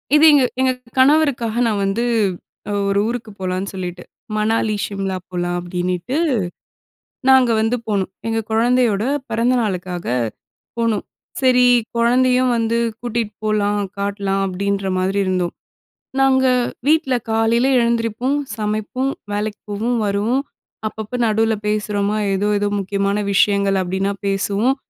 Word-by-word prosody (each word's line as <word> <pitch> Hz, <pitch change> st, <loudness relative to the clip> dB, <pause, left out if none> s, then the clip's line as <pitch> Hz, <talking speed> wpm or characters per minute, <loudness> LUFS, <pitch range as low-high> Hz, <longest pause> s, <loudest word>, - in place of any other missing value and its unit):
இது 300 Hz, -, +5 dB
எங்க 285 Hz, -3 st, +5 dB, 0.2 s
எங்க 260 Hz, 0 st, +3 dB, 0.3 s
கணவருக்காக 265 Hz, -5 st, +3 dB
நான் 210 Hz, -3 st, 0 dB
வந்து 205 Hz, +5 st, 0 dB, 0.9 s
ஒரு 200 Hz, 0 st, +2 dB
ஊருக்கு 230 Hz, -2 st, -4 dB
போலான்னு 185 Hz, +1 st, -2 dB
சொல்லிட்டு 180 Hz, -1 st, -5 dB, 0.3 s
"மணாலி, 215 Hz, 0 st, +1 dB
சிம்லா 195 Hz, -2 st, -3 dB
போகலாம்" 175 Hz, -1 st, -2 dB
அப்படினீட்டு 180 Hz, +6 st, -3 dB, 1.1 s
நாங்க 260 Hz, -2 st, +6 dB
வந்து 225 Hz, +3 st, +1 dB
போனோம். 195 Hz, -3 st, -1 dB, 0.2 s
எங்க 225 Hz, 0 st, 0 dB
கொழந்தையோட 230 Hz, -2 st, +2 dB, 0.3 s
பெறந்த 230 Hz, +3 st, +1 dB
நாளுக்காக 180 Hz, -4 st, -3 dB, 0.7 s
போனோம். 230 Hz, -3 st, 0 dB, 0.4 s
சரி 250 Hz, -1 st, +5 dB, 0.3 s
குழந்தையும் 250 Hz, +2 st, +3 dB
வந்து 230 Hz, 0 st, 0 dB, 0.2 s
கூட்டிட்டு 235 Hz, -3 st, -3 dB
போலாம், 205 Hz, -1 st, +1 dB, 0.2 s
காட்லாம் 200 Hz, -1 st, -1 dB
அப்படின்ற 195 Hz, +1 st, -2 dB
மாரி 190 Hz, +2 st, 0 dB
இருந்தோம். 185 Hz, -2 st, 0 dB, 0.7 s
நாங்க 265 Hz, -1 st, +4 dB, 0.4 s
வீட்ல 305 Hz, -4 st, +3 dB, 0.2 s
காலையில 225 Hz, +3 st, +2 dB
எழுந்திரிப்போம், 235 Hz, +3 st, 0 dB, 0.2 s
சமைப்போம், 215 Hz, +5 st, -2 dB, 0.2 s
வேலைக்கு 210 Hz, 0 st, -3 dB
போவோம், 230 Hz, +4 st, -1 dB
வருவோம். 215 Hz, +7 st, 0 dB, 0.4 s
அப்பப்ப 220 Hz, +3 st, -5 dB
நடுவுல 220 Hz, +1 st, +2 dB
பேசுறோமா 210 Hz, 0 st, 0 dB, 0.2 s
ஏதோ 200 Hz, +2 st, 0 dB
ஏதோ 205 Hz, -, 0 dB
முக்கியமான 200 Hz, +1 st, -1 dB, 0.2 s
விஷயங்கள் 200 Hz, -1 st, +3 dB
அப்படினா 190 Hz, +2 st, -1 dB
பேசுவோம். 200 Hz, +6 st, +1 dB
215 Hz, 115 wpm, -19 LUFS, 195-240 Hz, 1.1 s, நாங்க